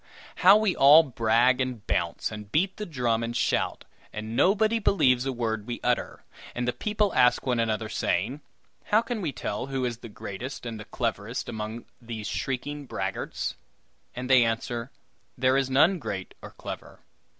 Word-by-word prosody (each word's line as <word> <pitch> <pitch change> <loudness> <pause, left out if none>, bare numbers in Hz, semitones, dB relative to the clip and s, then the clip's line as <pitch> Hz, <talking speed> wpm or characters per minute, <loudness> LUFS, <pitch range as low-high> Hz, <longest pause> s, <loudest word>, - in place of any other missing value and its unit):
How 195 +3 +8
we 215 -4 +1
all 145 +4 +8
brag 120 -1 +2
and 125 -5 -3
bounce, - - -1
and 105 -1 -8
beat 190 +5 +1
the 210 - -5
drum 120 -7 0
and 115 0 -2
shout; - - 0 0.3
and 110 +1 -6
nobody 215 - +3
believes 130 - +3
a - - 0
word 110 -4 -2
we 120 - -4
utter; 125 0 -1 0.3
and 125 0 -2
the 125 - +1
people 210 -2 0
ask 125 0 +4
one 125 -3 +1
another, 110 -1 0
saying: 110 - -1 0.4
"How 215 +2 +3
can 235 -3 -3
we 160 -6 -1
tell 115 -1 -4
who 135 -2 -2
is 120 -2 -3
the 115 - -10
greatest 110 +6 -7
and 115 -2 -5
the 105 - -8
cleverest 115 0 -3
among 110 0 -5
all - - -27 0.2
these 115 -2 -6
shrieking 140 +2 -3
braggarts?" 95 -4 -3 0.6
And 125 +1 -4
they 130 -2 +6
answer: 115 +2 -2 0.5
"There 130 +1 +3
is 135 -1 +1
none 160 +8 +4
great 100 -7 -5
or - - -9
clever. - - -9
125 Hz, 175 wpm, -27 LUFS, 115-145 Hz, 0.6 s, How